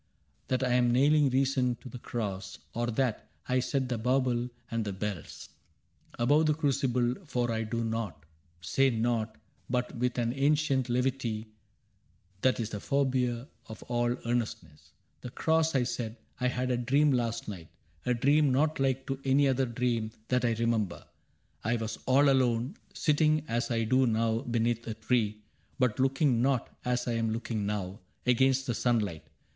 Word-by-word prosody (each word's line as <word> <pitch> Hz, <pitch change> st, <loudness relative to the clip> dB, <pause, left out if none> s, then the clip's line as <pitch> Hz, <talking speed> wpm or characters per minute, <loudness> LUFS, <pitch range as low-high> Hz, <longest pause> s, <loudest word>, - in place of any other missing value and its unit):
That 130 Hz, 0 st, 0 dB
I 125 Hz, -1 st, +1 dB
am 120 Hz, -1 st, +3 dB
nailing 145 Hz, +3 st, +4 dB
reason 130 Hz, -1 st, +1 dB
to 125 Hz, -, -13 dB
the 125 Hz, -1 st, -8 dB
cross, 100 Hz, -5 st, -4 dB, 0.2 s
Or 120 Hz, +1 st, -1 dB
that 120 Hz, -1 st, -1 dB, 0.2 s
I 130 Hz, 0 st, +2 dB
set 130 Hz, +1 st, -1 dB
the 120 Hz, -3 st, -2 dB
bauble 125 Hz, 0 st, +1 dB, 0.2 s
and 115 Hz, -1 st, 0 dB
the 100 Hz, -2 st, -3 dB
bells 95 Hz, -3 st, -5 dB, 0.7 s
Above 145 Hz, +6 st, +3 dB
the 150 Hz, -, +3 dB
crucible; 130 Hz, -5 st, +1 dB
for 125 Hz, -7 st, -1 dB
I 110 Hz, 0 st, -1 dB
do 115 Hz, +1 st, -2 dB
nought. 110 Hz, -10 st, -3 dB, 0.4 s
Say 135 Hz, +10 st, +2 dB
nought, 115 Hz, -2 st, 0 dB, 0.3 s
but 125 Hz, 0 st, -1 dB
with 125 Hz, +1 st, -1 dB
an 120 Hz, -1 st, 0 dB
ancient 140 Hz, -2 st, +2 dB
levity 120 Hz, -3 st, -1 dB, 0.9 s
That 130 Hz, -1 st, +2 dB
is 115 Hz, -1 st, -3 dB
the 105 Hz, -, -4 dB
forbear 130 Hz, -2 st, 0 dB, 0.2 s
of 110 Hz, -2 st, -9 dB
all 120 Hz, 0 st, 0 dB
earnestness. 110 Hz, -11 st, -3 dB, 0.3 s
^^ -, -, -40 dB
The 125 Hz, -, -6 dB
cross, 160 Hz, +3 st, +1 dB
I 130 Hz, -, +3 dB
said. 120 Hz, -2 st, -4 dB
— -, -, -34 dB
I 125 Hz, -, +3 dB
had 125 Hz, 0 st, -1 dB
a 125 Hz, -, +1 dB
dream 140 Hz, +5 st, +3 dB
last 115 Hz, -2 st, -1 dB
night: 90 Hz, -6 st, -7 dB, 0.4 s
A 125 Hz, -, +3 dB
dream 145 Hz, +4 st, +3 dB
not 150 Hz, +4 st, +1 dB
like 135 Hz, -1 st, +1 dB
to 135 Hz, 0 st, -3 dB
any 135 Hz, +1 st, +4 dB
other 135 Hz, 0 st, +1 dB
dream 120 Hz, -2 st, -1 dB, 0.2 s
That 125 Hz, 0 st, +2 dB
I 115 Hz, -, +2 dB
remember. 110 Hz, -5 st, -1 dB, 0.6 s
I 115 Hz, +3 st, +1 dB
was 110 Hz, -1 st, -4 dB
all 140 Hz, +3 st, +5 dB
alone. 130 Hz, -, +2 dB, 0.2 s
Sitting 155 Hz, 0 st, +2 dB
as 120 Hz, +3 st, -1 dB
I 115 Hz, -2 st, +1 dB
do 130 Hz, +3 st, +3 dB
now 115 Hz, 0 st, +1 dB
beneath 120 Hz, -2 st, -1 dB
a 110 Hz, -, -3 dB
tree. 110 Hz, -2 st, 0 dB, 0.3 s
But 125 Hz, -4 st, +1 dB
looking 135 Hz, -2 st, +2 dB
not, 130 Hz, -2 st, 0 dB
as 125 Hz, 0 st, -1 dB
I -, -, +1 dB
am 115 Hz, -1 st, 0 dB
looking 110 Hz, -2 st, -2 dB
now. 100 Hz, -1 st, -3 dB, 0.3 s
Against 130 Hz, +2 st, +3 dB
the 120 Hz, -, -1 dB
sunlight. 105 Hz, -9 st, 0 dB
120 Hz, 170 wpm, -30 LUFS, 115-130 Hz, 0.9 s, all